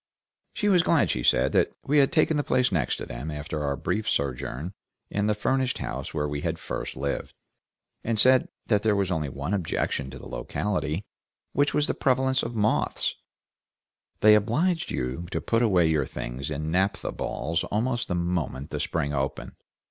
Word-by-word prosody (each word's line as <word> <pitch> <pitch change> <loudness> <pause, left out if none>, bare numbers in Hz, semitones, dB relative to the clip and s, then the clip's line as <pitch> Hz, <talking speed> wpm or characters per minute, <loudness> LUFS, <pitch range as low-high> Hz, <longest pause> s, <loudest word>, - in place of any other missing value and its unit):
She 210 - 0
was 185 -4 +5
glad, 170 -3 +3
she 60 - -1
said, - - +3
that - - +2
we 145 +2 +4
had 135 - +4
taken 160 -1 +3
the 145 - +1
place 125 -2 +2
next 80 -10 0
them, - - -5
after 75 0 -4
our 70 -1 0
brief 105 +10 -1
sojourn 70 +4 -2 0.4
in 105 0 0
the 105 - +2
furnished 130 +4 0
house 65 +1 -4
where 75 0 -1
we 70 0 -3
had - - -1
first - - -5
lived, 70 +1 -3 0.7
and 115 -1 0
said 130 +4 +5 0.2
that 105 -3 +2
there 110 -1 +2
was 100 -2 0
only 80 -5 -1
one 70 +7 -4
objection 80 -7 -1
to 65 - -8
the - - -10
locality, 90 +6 -2 0.5
which 145 +1 +2
was 150 - +3
the - - 0
prevalence 130 0 +2
of 115 0 -4
moths; 110 0 +1 1.1
they 105 0 +8
obliged 150 - +2
you 65 +8 -3
to - - -2
put 115 0 +1
away 95 -7 +4
your 75 -4 +2
things 65 +3 -5
in 75 +1 -3
naphtha 95 +1 0
balls 80 +1 -2
almost 120 +3 -1
the 90 - -1
moment 85 -5 -2
the 75 - -3
spring 75 -1 -1
opened. 70 -1 -2
90 Hz, 180 wpm, -26 LUFS, 75-120 Hz, 1.1 s, they